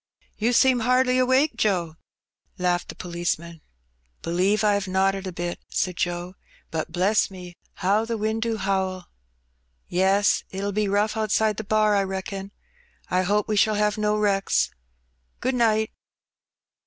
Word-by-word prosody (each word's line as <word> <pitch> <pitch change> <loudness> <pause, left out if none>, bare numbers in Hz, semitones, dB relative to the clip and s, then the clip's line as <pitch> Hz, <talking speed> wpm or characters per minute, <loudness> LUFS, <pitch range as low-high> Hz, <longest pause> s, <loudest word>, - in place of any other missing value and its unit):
You 225 +3 +1
seem 250 +1 +4
hardly 255 +2 +3
awake, 260 +2 +3
Joe," 180 -8 0 0.6
laughed 180 -1 0
the - - -7
policeman. 170 -2 -4 0.6
"Believe 190 +6 +1
I 210 -1 +4
'ave 200 -2 -2
nodded 195 +1 +1
a - - -4
bit," 175 0 -4
said 180 -1 -1
Joe. 175 +1 -2 0.4
"But, 160 0 -3
bless 190 +5 +2
me, 180 -2 -10 0.3
how 205 +4 +3
the 230 0 -3
wind 220 +1 -1
do 225 -1 -1
howl! 190 -2 -1 0.4
'* - - -45 0.2
"Yes, 195 +3 +2
it'll 200 +1 -3
be 210 +1 0
rough 205 +2 +1
outside 215 -1 +1
the - - -4
*bar,' 215 0 +2
I 200 - +3
reckon. 195 +1 -5 0.6
I 185 - +3
hope 205 +3 +1
we 215 - 0
shall 215 +1 +3
have 210 0 +1
no 210 0 0
wrecks. 200 -2 +1 0.7
Good 260 - -1
night." 220 -3 +2
200 Hz, 155 wpm, -24 LUFS, 185-215 Hz, 0.7 s, seem